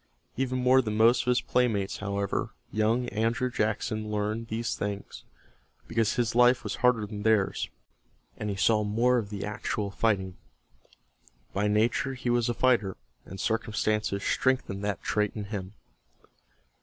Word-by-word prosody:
Even 130 Hz, +1 st, -1 dB
more 130 Hz, +1 st, +5 dB
than 110 Hz, -3 st, -3 dB
most 120 Hz, +2 st, +5 dB
of -, -, -8 dB
his 125 Hz, 0 st, +3 dB
playmates 110 Hz, -6 st, 0 dB
however, 100 Hz, 0 st, -2 dB, 0.2 s
young 115 Hz, +3 st, +1 dB
Andrew 115 Hz, +3 st, 0 dB
Jackson 110 Hz, -1 st, -1 dB
learned 105 Hz, +2 st, -2 dB
these 115 Hz, +1 st, -2 dB
things, 100 Hz, 0 st, -5 dB, 0.6 s
because 115 Hz, -2 st, +1 dB
his 120 Hz, -2 st, 0 dB
life 125 Hz, +1 st, +5 dB
was -, -, -4 dB
harder 125 Hz, -4 st, +3 dB
than 105 Hz, 0 st, -7 dB
theirs, 110 Hz, -2 st, +1 dB, 0.7 s
and 105 Hz, -, -4 dB
he 100 Hz, -, -2 dB
saw 105 Hz, +3 st, +3 dB
more 120 Hz, +4 st, +2 dB
of 105 Hz, -3 st, -5 dB
the 100 Hz, -1 st, -4 dB
actual 105 Hz, -1 st, -3 dB
fighting. 95 Hz, -4 st, 0 dB, 1.2 s
By 100 Hz, +1 st, +1 dB
nature 115 Hz, +6 st, +1 dB
he 125 Hz, -1 st, -2 dB
was 120 Hz, 0 st, +2 dB
a 120 Hz, -, -1 dB
fighter, 115 Hz, -8 st, +2 dB, 0.3 s
and 95 Hz, -, -8 dB
circumstances 110 Hz, -2 st, 0 dB
strengthened 125 Hz, -7 st, 0 dB
that 100 Hz, -3 st, -2 dB
trait 105 Hz, -1 st, 0 dB
in 105 Hz, -, -4 dB
him. 95 Hz, 0 st, -5 dB
110 Hz, 150 wpm, -28 LUFS, 105-120 Hz, 1.2 s, more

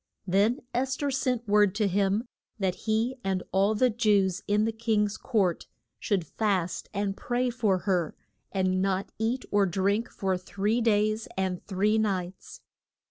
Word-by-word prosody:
Then 200 Hz, +7 st, +2 dB
Es 260 Hz, +2 st, 0 dB
ther 285 Hz, -1 st, -1 dB
sent 250 Hz, -3 st, -1 dB
word 205 Hz, -1 st, +4 dB
to 210 Hz, -1 st, +2 dB
him 200 Hz, +4 st, +1 dB, 0.3 s
that 190 Hz, -3 st, 0 dB
he 225 Hz, +6 st, -1 dB
and 190 Hz, -1 st, -1 dB
all 195 Hz, +3 st, +3 dB
the 250 Hz, +3 st, +3 dB
Jews 205 Hz, -5 st, +2 dB
in 210 Hz, +1 st, +2 dB
the 225 Hz, -, 0 dB
king's 220 Hz, -2 st, 0 dB
court 195 Hz, -9 st, 0 dB, 0.3 s
should 195 Hz, -6 st, 0 dB
fast 185 Hz, -1 st, -1 dB
and 200 Hz, -1 st, -2 dB
pray 245 Hz, +2 st, -1 dB
for 220 Hz, -6 st, +1 dB
her, 180 Hz, -4 st, -1 dB, 0.4 s
and 185 Hz, -1 st, +1 dB
not 195 Hz, 0 st, -1 dB
eat 235 Hz, +4 st, -1 dB
or 200 Hz, -1 st, +3 dB
drink 200 Hz, +5 st, 0 dB
for 190 Hz, -2 st, -1 dB
three 205 Hz, +5 st, -1 dB
days 215 Hz, 0 st, +1 dB
and 190 Hz, -2 st, -1 dB
three 210 Hz, +3 st, +2 dB
nights. 190 Hz, -4 st, -3 dB
205 Hz, 155 wpm, -28 LUFS, 190-225 Hz, 0.4 s, word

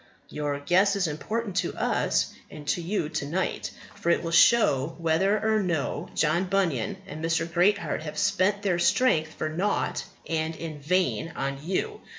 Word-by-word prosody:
Your 145 Hz, -1 st, -3 dB
guess 190 Hz, +7 st, +3 dB
is 195 Hz, -2 st, +1 dB
important 205 Hz, +7 st, -3 dB
to -, -, 0 dB
us -, -, 0 dB, 0.2 s
and 150 Hz, -1 st, -10 dB
to 175 Hz, -, +1 dB
you 170 Hz, -2 st, -1 dB
to 140 Hz, -, -3 dB
night; 180 Hz, +5 st, -2 dB, 0.2 s
for 170 Hz, -, -3 dB
it 170 Hz, -, +2 dB
will 165 Hz, -, -3 dB
show 165 Hz, -, +4 dB
whether 170 Hz, +5 st, +2 dB
or 220 Hz, 0 st, +2 dB
no 170 Hz, -7 st, -2 dB
John 165 Hz, +4 st, +2 dB
Bunyan 190 Hz, -, 0 dB
and 155 Hz, +2 st, -8 dB
Mr. 165 Hz, 0 st, +1 dB
Greatheart 180 Hz, +2 st, +1 dB
have 150 Hz, -1 st, -7 dB
spent 200 Hz, +2 st, +1 dB
their 180 Hz, -4 st, +1 dB
strength 160 Hz, -8 st, +2 dB
for -, -, -2 dB
nought 180 Hz, +7 st, -1 dB, 0.2 s
and 160 Hz, 0 st, -1 dB
in 160 Hz, -3 st, -6 dB
vain 170 Hz, +1 st, 0 dB
on 135 Hz, 0 st, -3 dB
you. 185 Hz, +3 st, -2 dB
170 Hz, 165 wpm, -26 LUFS, 155-195 Hz, 0.2 s, show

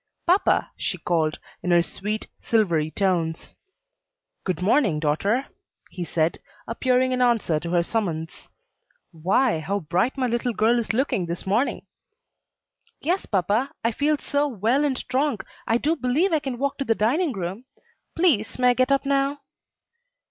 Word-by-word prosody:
"Papa!" 360 Hz, +4 st, +2 dB
she -, -, -2 dB
called, 160 Hz, -3 st, 0 dB, 0.2 s
in 180 Hz, -, -3 dB
her 175 Hz, -1 st, +5 dB
sweet, 210 Hz, +5 st, -4 dB
silvery 170 Hz, -9 st, +1 dB
tones. 170 Hz, -3 st, -1 dB, 0.9 s
"Good 185 Hz, -4 st, -2 dB
morning, 200 Hz, -, +2 dB
daughter," 195 Hz, -, +1 dB, 0.5 s
he 180 Hz, -, -5 dB
said, 165 Hz, +1 st, 0 dB, 0.3 s
appearing 255 Hz, +2 st, +1 dB
in 250 Hz, 0 st, 0 dB
answer 225 Hz, -10 st, +2 dB
to 170 Hz, -, -6 dB
her 175 Hz, 0 st, +2 dB
summons. 170 Hz, -6 st, -3 dB, 0.6 s
"Why, 185 Hz, +5 st, +1 dB
how 195 Hz, +6 st, -2 dB
bright 185 Hz, -, 0 dB
my 260 Hz, -, +1 dB
little 240 Hz, 0 st, -1 dB
girl 225 Hz, +3 st, +3 dB
is 230 Hz, -, -1 dB
looking 220 Hz, -7 st, 0 dB
this 170 Hz, +1 st, -5 dB
morning!" 215 Hz, +8 st, 0 dB, 1.1 s
"Yes, 355 Hz, +6 st, -1 dB
papa, 210 Hz, +7 st, 0 dB
I 230 Hz, -, +2 dB
feel 295 Hz, +5 st, +1 dB
so 285 Hz, +1 st, 0 dB
well 240 Hz, +3 st, +1 dB
and 275 Hz, -3 st, 0 dB
strong 270 Hz, -1 st, 0 dB, 0.3 s
I 225 Hz, -, +3 dB
do 305 Hz, +6 st, +1 dB
believe 300 Hz, +7 st, +1 dB
I 315 Hz, -, +4 dB
can 265 Hz, -4 st, -4 dB
walk 280 Hz, +3 st, -2 dB
to -, -, 0 dB
the 225 Hz, -4 st, +1 dB
dining 285 Hz, -, +1 dB
room. 195 Hz, +5 st, -5 dB, 0.5 s
Please, 310 Hz, -, +2 dB
may 250 Hz, -1 st, +4 dB
I -, -, +5 dB
get 255 Hz, +2 st, +1 dB
up 275 Hz, 0 st, +2 dB
now?" 275 Hz, +1 st, +1 dB
230 Hz, 155 wpm, -24 LUFS, 180-270 Hz, 1.1 s, her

